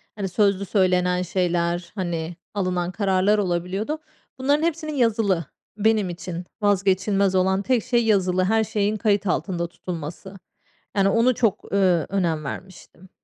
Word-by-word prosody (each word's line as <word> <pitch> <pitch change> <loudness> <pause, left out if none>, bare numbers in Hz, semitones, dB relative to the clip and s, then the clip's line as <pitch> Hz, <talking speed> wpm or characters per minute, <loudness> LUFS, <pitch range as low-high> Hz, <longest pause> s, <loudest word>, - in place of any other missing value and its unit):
Hani, 200 -2 -3
sözlü 200 +1 +2
söylenen 180 -2 +2
şeyler, 175 -1 -1
hani, 175 -3 -3 0.2
alınan 180 -3 -1
kararlar 195 +1 +2
olabiliyordu. 195 - -2 0.4
Bunların 285 +4 +2
hepsinin 315 -2 -1
yazılı, 220 - +1 0.3
benim 215 -2 +2
için 175 0 -6 0.2
vazgeçilmez 195 -1 +2
olan 190 +1 +2
tek 240 +1 +1
şey, 240 -2 +1
yazılı 185 -3 +2
her 220 +3 +2
şeyin 210 0 -1
kayıt 205 -2 +1
altında 175 -1 -1
tutulması. 175 +3 -7 0.6
Yani, 195 0 +4
onu 230 +4 +3
çok, 220 -5 -1
ııı, 185 -5 +3
önem 170 -6 0
vermiştim. 185 +4 -9
190 Hz, 130 wpm, -23 LUFS, 180-210 Hz, 0.6 s, Yani